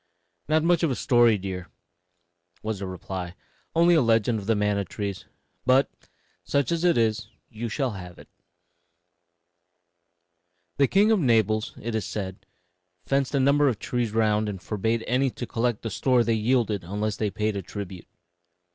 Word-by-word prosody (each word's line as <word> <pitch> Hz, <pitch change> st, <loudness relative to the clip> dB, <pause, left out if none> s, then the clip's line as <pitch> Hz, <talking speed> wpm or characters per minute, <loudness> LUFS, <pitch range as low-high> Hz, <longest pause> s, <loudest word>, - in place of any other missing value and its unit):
"Not 155 Hz, 0 st, +3 dB
much 170 Hz, 0 st, +3 dB
of 165 Hz, -, +2 dB
a 130 Hz, -, -1 dB
story, 120 Hz, -1 st, +4 dB
dear," 90 Hz, -2 st, -5 dB, 1.0 s
was 110 Hz, -2 st, -3 dB
the 100 Hz, -, -4 dB
reply 90 Hz, 0 st, -6 dB, 0.4 s
"only 170 Hz, +1 st, +5 dB
a -, -, +5 dB
little 130 Hz, -, +2 dB
legend 115 Hz, 0 st, +2 dB
of 100 Hz, -, -9 dB
the 115 Hz, -, +3 dB
manna 105 Hz, -1 st, +1 dB
trees; 100 Hz, -1 st, -5 dB, 0.4 s
but, 130 Hz, +2 st, +3 dB, 0.5 s
such 140 Hz, -1 st, 0 dB
as 170 Hz, 0 st, 0 dB
it 175 Hz, -5 st, +4 dB
is, 110 Hz, -3 st, +1 dB, 0.2 s
you 115 Hz, +1 st, -5 dB
shall 130 Hz, +3 st, -1 dB
have 90 Hz, -4 st, -9 dB
it: -, -, -14 dB, 2.5 s
"The 140 Hz, -1 st, +4 dB
king 205 Hz, -, +4 dB
of 220 Hz, -, +4 dB
Naples, 110 Hz, -, +2 dB
it 115 Hz, +1 st, -4 dB
is 110 Hz, -3 st, -2 dB
said, 100 Hz, -1 st, -6 dB, 0.6 s
fenced 135 Hz, 0 st, 0 dB
a -, -, +3 dB
number 140 Hz, +2 st, +4 dB
of 125 Hz, -6 st, +1 dB
trees 120 Hz, -1 st, -2 dB
round 110 Hz, -1 st, +1 dB
and 100 Hz, -2 st, -5 dB
forbade 110 Hz, +4 st, -1 dB
any 130 Hz, +3 st, +1 dB
to 120 Hz, -, -6 dB
collect 115 Hz, -1 st, -1 dB
the 115 Hz, -, -3 dB
store 125 Hz, +3 st, +2 dB
they 115 Hz, 0 st, +1 dB
yielded 110 Hz, -3 st, +1 dB
unless 105 Hz, +4 st, -3 dB
they 105 Hz, -, 0 dB
paid 105 Hz, +1 st, -2 dB
a 100 Hz, -, -2 dB
tribute. 95 Hz, -1 st, -8 dB
110 Hz, 170 wpm, -25 LUFS, 100-130 Hz, 2.5 s, only